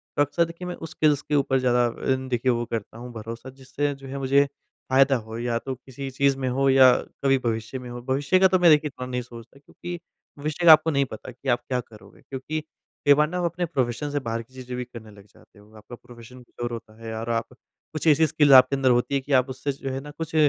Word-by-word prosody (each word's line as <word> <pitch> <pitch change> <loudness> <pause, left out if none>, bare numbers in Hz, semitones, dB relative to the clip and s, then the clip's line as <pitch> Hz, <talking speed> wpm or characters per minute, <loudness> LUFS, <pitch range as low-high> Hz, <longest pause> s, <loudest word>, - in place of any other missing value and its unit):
तो 145 - +2
अक्सर 170 +4 +2
देखिए 170 +2 -8
मैं 180 - -4
उस 165 -1 -9
स्किल्स 150 -2 +2
के 150 - -2
ऊपर 135 -2 +2
ज़्यादा 125 -1 +2 0.3
अन 130 0 -4
देखिए 125 +1 +1
वो 120 0 -1
करता 115 -1 -5
हूँ 125 +1 -9
भरोसा, 115 +3 -8
जिससे 135 +2 -3
जो 135 0 -12
है 135 +1 -6
मुझे 140 +1 +3 0.4
फ़ायदा 135 +1 +4
हो 110 -1 -6
या 120 -1 -1
तो 135 +1 -5
किसी 135 +2 -8
चीज़ 135 +1 +1
में 130 - -2
हो 135 +2 +1
या 130 -1 +7 0.3
कभी 135 -1 +4
भविष्य 115 +3 -2
में 125 -1 -9
हो। 120 0 -7
भविष्य 135 +7 +1
का 190 - +6
तो 185 -1 +2
मैं 175 -2 +6
देखिए 150 0 +4
इतना 125 -2 -7
नहीं 125 0 -3
सोचता 120 +2 -13
क्योंकि 175 +4 -8 0.4
भविष्य 155 +4 -3
का 165 - +10
आपको 160 +1 +6
नहीं 140 -1 +2
पता 110 +4 -8
कि 130 +2 -7
आप 120 0 +3
क्या 125 -1 -1
करोगे 105 -3 -17
क्योंकि 150 +4 -5 0.4
कई 145 - +8
बार 150 +1 +3
ना 180 - -4
आप 180 - -1
अपने 175 +1 -1
प्रोफेशन 135 -2 -2
से 145 - -1
बाहर 115 -3 -3
की 120 +3 -18
चीज़ें 125 -1 -7
भी 125 - -3
करने 115 -3 -12
लग 100 -1 -16
जाते 105 - -22
हो। 105 +1 -20
आपका 120 +3 -11
प्रोफेशन 120 +1 -14
कुछ 120 - -15
और 120 - -2
होता 110 -1 -9
है 115 0 -5
और 115 +1 -5
आप 115 0 0 0.5
कुछ 155 +1 -3
ऐसी 155 +1 +5
स्किल्स 150 -1 +3
आपके 130 +1 +7
अंदर 135 -1 +2
होती 125 +3 +2
है 135 - +1
कि 140 - -10
आप 130 0 +3
उससे 130 +2 -3
जो 135 0 -6
है 130 - -3
ना 150 - -10
कुछ 165 -1 -5
130 Hz, 260 wpm, -24 LUFS, 120-145 Hz, 0.5 s, का